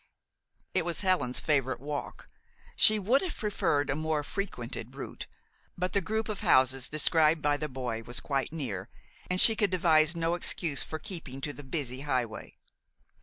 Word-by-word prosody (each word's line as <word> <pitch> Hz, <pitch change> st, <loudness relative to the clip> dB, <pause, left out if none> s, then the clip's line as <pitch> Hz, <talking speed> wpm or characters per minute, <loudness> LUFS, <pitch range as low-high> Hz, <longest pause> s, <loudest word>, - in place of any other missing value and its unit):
It -, -, +1 dB
was 170 Hz, +2 st, -2 dB
Helen's 185 Hz, -10 st, +1 dB
favorite 135 Hz, -4 st, 0 dB
walk. 145 Hz, +1 st, -6 dB, 0.5 s
She 215 Hz, -, +6 dB
would 225 Hz, +7 st, +2 dB
have 370 Hz, -, -4 dB
preferred 150 Hz, -9 st, 0 dB
a 135 Hz, -, -1 dB
more 155 Hz, -1 st, -1 dB
frequented 130 Hz, -, -5 dB
route; 140 Hz, -, -7 dB, 0.5 s
but 180 Hz, +1 st, -2 dB
the 200 Hz, -, +2 dB
group 220 Hz, +4 st, -2 dB
of 215 Hz, -3 st, -4 dB
houses 130 Hz, 0 st, +3 dB
described 155 Hz, +1 st, +3 dB
by 145 Hz, 0 st, +2 dB
the 150 Hz, +1 st, -4 dB
boy 125 Hz, -4 st, -4 dB
was 120 Hz, +2 st, -5 dB
quite 135 Hz, -1 st, -2 dB
near, 115 Hz, -, -5 dB, 0.4 s
and 180 Hz, 0 st, +2 dB
she 225 Hz, -, +9 dB
could 205 Hz, -2 st, +2 dB
devise 165 Hz, -3 st, +3 dB
no 165 Hz, 0 st, 0 dB
excuse 170 Hz, -4 st, -1 dB
for 155 Hz, -, -3 dB
keeping 155 Hz, -7 st, -6 dB
to 145 Hz, +1 st, -3 dB
the 145 Hz, -, -10 dB
busy 130 Hz, -2 st, -3 dB
highway. 125 Hz, -6 st, -3 dB
150 Hz, 170 wpm, -29 LUFS, 130-180 Hz, 0.5 s, she